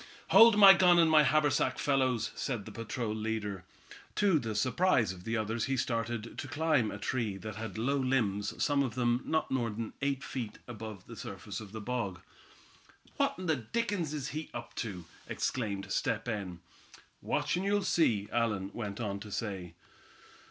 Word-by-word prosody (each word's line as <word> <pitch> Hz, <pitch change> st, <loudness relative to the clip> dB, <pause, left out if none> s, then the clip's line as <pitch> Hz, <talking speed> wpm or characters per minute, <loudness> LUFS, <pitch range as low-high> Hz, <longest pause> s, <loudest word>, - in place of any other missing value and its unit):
"Hold 225 Hz, -1 st, +8 dB
my 195 Hz, -2 st, +11 dB
gun 180 Hz, -2 st, +5 dB
and 165 Hz, -2 st, +5 dB
my 155 Hz, -1 st, +7 dB
haversack, 145 Hz, -3 st, +2 dB
fellows," 130 Hz, -5 st, +1 dB
said 120 Hz, -7 st, -3 dB
the -, -, -8 dB
patrol 115 Hz, -1 st, -3 dB
leader. 110 Hz, -2 st, -3 dB, 0.5 s
To 195 Hz, -6 st, +3 dB
the 110 Hz, -4 st, -4 dB
surprise 130 Hz, -, +2 dB
of 90 Hz, -1 st, -13 dB
the 115 Hz, +1 st, -1 dB
others 110 Hz, +1 st, -1 dB
he 135 Hz, 0 st, -1 dB
started 115 Hz, -2 st, -2 dB
to 145 Hz, -, -4 dB
climb 145 Hz, -5 st, +1 dB
a 105 Hz, -, -5 dB
tree 105 Hz, -1 st, -2 dB
that 110 Hz, +1 st, -7 dB
had 110 Hz, 0 st, -6 dB
low 135 Hz, +6 st, +1 dB
limbs 110 Hz, -7 st, 0 dB
some 145 Hz, -1 st, +2 dB
of 130 Hz, -4 st, -2 dB
them 120 Hz, 0 st, +1 dB
not 160 Hz, 0 st, 0 dB
more 120 Hz, -3 st, 0 dB
than 110 Hz, +1 st, -5 dB
eight 140 Hz, -1 st, -1 dB
feet 115 Hz, -5 st, -5 dB
above 110 Hz, -5 st, -8 dB
the -, -, -10 dB
surface -, -, -7 dB
of 105 Hz, -3 st, -10 dB
the 110 Hz, 0 st, -6 dB
bog. 105 Hz, -5 st, -3 dB, 1.0 s
"What -, -, +1 dB
in 185 Hz, -, -6 dB
the 160 Hz, -2 st, +2 dB
dickens 180 Hz, -, -2 dB
is 145 Hz, -3 st, -3 dB
he 155 Hz, +1 st, -5 dB
up 120 Hz, 0 st, -7 dB
to?" 95 Hz, -7 st, -4 dB, 0.2 s
exclaimed 100 Hz, -6 st, -2 dB
Step -, -, 0 dB
Hen. 100 Hz, -7 st, -4 dB, 0.6 s
"Watch, -, -, 0 dB
and 180 Hz, -, -1 dB
you'll 200 Hz, 0 st, +1 dB
see," 115 Hz, -, +2 dB
Allan 105 Hz, -5 st, 0 dB
went 105 Hz, -3 st, -5 dB
on 100 Hz, -4 st, -3 dB
to 105 Hz, +1 st, -9 dB
say. 95 Hz, -6 st, -4 dB
120 Hz, 180 wpm, -31 LUFS, 105-140 Hz, 1.0 s, my